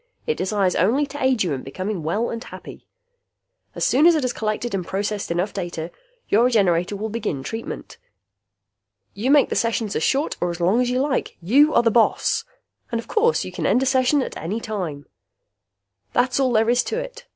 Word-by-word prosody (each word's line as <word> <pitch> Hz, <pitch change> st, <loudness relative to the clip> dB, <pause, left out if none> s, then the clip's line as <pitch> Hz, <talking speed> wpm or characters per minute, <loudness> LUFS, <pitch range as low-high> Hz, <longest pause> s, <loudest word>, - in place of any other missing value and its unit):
It 465 Hz, -, +1 dB
desires 195 Hz, -2 st, 0 dB
only 240 Hz, -, +2 dB
to 285 Hz, -1 st, -6 dB
aid 260 Hz, -5 st, +3 dB
you 170 Hz, -5 st, -1 dB
in 130 Hz, -, -4 dB
becoming 185 Hz, +7 st, -4 dB
well 200 Hz, +10 st, -1 dB
and 230 Hz, +1 st, -5 dB
happy. -, -, -11 dB, 0.9 s
As -, -, 0 dB
soon 290 Hz, +6 st, +5 dB
as 345 Hz, -, +6 dB
it 305 Hz, -, 0 dB
has 250 Hz, -1 st, -1 dB
collected 215 Hz, +2 st, -3 dB
and 190 Hz, -2 st, -1 dB
processed 200 Hz, +3 st, -3 dB
enough 175 Hz, +4 st, -1 dB
data, 175 Hz, -3 st, -5 dB, 0.4 s
your 225 Hz, +4 st, +4 dB
Regenerator 195 Hz, -6 st, +2 dB
will 215 Hz, +2 st, -4 dB
begin 205 Hz, -12 st, -3 dB
treatment. 225 Hz, +9 st, -7 dB, 1.1 s
You 220 Hz, +6 st, -2 dB
make 285 Hz, -1 st, +5 dB
the -, -, -2 dB
sessions 225 Hz, -3 st, 0 dB
as -, -, 0 dB
short 275 Hz, -, 0 dB
or 175 Hz, -, +1 dB
as 170 Hz, 0 st, -5 dB
long 190 Hz, +8 st, +3 dB
as 250 Hz, -, 0 dB
you 250 Hz, +1 st, 0 dB
like. 275 Hz, -1 st, -1 dB
You 275 Hz, -, +4 dB
are 235 Hz, -, +5 dB
the 230 Hz, -, +3 dB
boss! 230 Hz, 0 st, +2 dB, 0.5 s
And 235 Hz, -, 0 dB
of 230 Hz, -, -8 dB
course 460 Hz, +2 st, +2 dB
you -, -, -7 dB
can -, -, -2 dB
end 255 Hz, -, +3 dB
a -, -, 0 dB
session 260 Hz, +1 st, +3 dB
at -, -, -7 dB
any 195 Hz, +8 st, -3 dB
time. 180 Hz, -11 st, -5 dB, 1.1 s
That's 250 Hz, +2 st, +2 dB
all 260 Hz, -2 st, +2 dB
there 225 Hz, +1 st, +3 dB
is 245 Hz, +1 st, +3 dB
to 450 Hz, -, -2 dB
it! -, -, -7 dB
225 Hz, 205 wpm, -22 LUFS, 190-260 Hz, 1.1 s, as